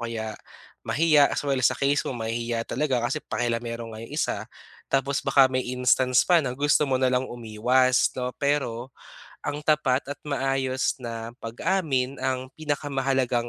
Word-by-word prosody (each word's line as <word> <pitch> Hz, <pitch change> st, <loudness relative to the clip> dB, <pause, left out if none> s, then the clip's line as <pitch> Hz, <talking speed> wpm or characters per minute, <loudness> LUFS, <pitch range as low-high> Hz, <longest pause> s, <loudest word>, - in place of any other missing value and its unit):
kaya 110 Hz, -1 st, -4 dB, 0.5 s
mahiya, 155 Hz, -2 st, +4 dB
as -, -, -2 dB
well 135 Hz, -2 st, 0 dB
sa 120 Hz, -, +3 dB
case 140 Hz, +1 st, +2 dB
mo, 125 Hz, -, -4 dB
mahihiya 115 Hz, 0 st, -2 dB
talaga 130 Hz, -6 st, -1 dB
kasi 135 Hz, +5 st, -1 dB
pakialamero 115 Hz, -1 st, -3 dB
nga 110 Hz, -, -8 dB
yong 115 Hz, -, -10 dB
isa. 110 Hz, -7 st, -1 dB, 0.4 s
Tapos 135 Hz, +1 st, +1 dB
baka 135 Hz, -2 st, +5 dB
may 130 Hz, -, +1 dB
instance 125 Hz, 0 st, +3 dB
pa 175 Hz, -2 st, +5 dB
na 125 Hz, -3 st, -4 dB
gusto 145 Hz, 0 st, +2 dB
mo 130 Hz, -, +2 dB
nalang 130 Hz, 0 st, +1 dB
umiwas, 120 Hz, +3 st, +2 dB
'no? 125 Hz, 0 st, -2 dB
Pero 135 Hz, -4 st, 0 dB, 0.5 s
ang 145 Hz, +1 st, -4 dB
tapat 150 Hz, -4 st, +2 dB
at 145 Hz, -, -16 dB
maayos 135 Hz, -1 st, 0 dB
na 115 Hz, -1 st, -6 dB
pag-amin 135 Hz, 0 st, -1 dB
ang 130 Hz, 0 st, -2 dB
pinakamahalagang 135 Hz, -5 st, -1 dB
130 Hz, 150 wpm, -25 LUFS, 120-140 Hz, 0.5 s, baka